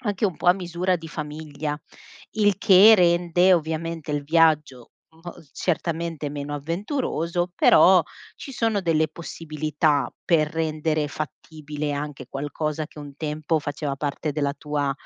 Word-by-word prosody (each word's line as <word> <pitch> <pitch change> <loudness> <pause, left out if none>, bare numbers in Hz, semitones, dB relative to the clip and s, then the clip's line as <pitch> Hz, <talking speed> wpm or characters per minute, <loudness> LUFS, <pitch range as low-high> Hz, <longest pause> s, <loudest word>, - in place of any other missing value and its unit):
anche 205 -2 -1
un 185 -5 0
po' - - -7
a 175 - +8
misura 180 0 -1
di 165 -2 -6
famiglia, 150 -1 -5 0.6
il 205 -3 +2
che 200 +3 +7
rende 175 0 +3
ovviamente 160 -1 -2
il 145 -1 -1
viaggio 150 -5 +2 0.3
mol 175 - -9
certamente 165 -3 -2
meno 145 0 -5
avventuroso, 175 - -2
però 185 -1 +6 0.3
ci 275 - -9
sono 225 -5 0
delle 160 -2 +2
possibilità 155 -3 -2
per 155 -3 +2
rendere 155 -1 -1
fattibile 150 0 -6
anche 145 0 -5
qualcosa 150 +2 -3
che 150 - -16
un 145 -1 -9
tempo 155 +1 -1
faceva 145 -1 -4
parte 145 +1 -3
della 145 -1 -1
tua 145 -1 -2
155 Hz, 135 wpm, -24 LUFS, 150-175 Hz, 0.6 s, a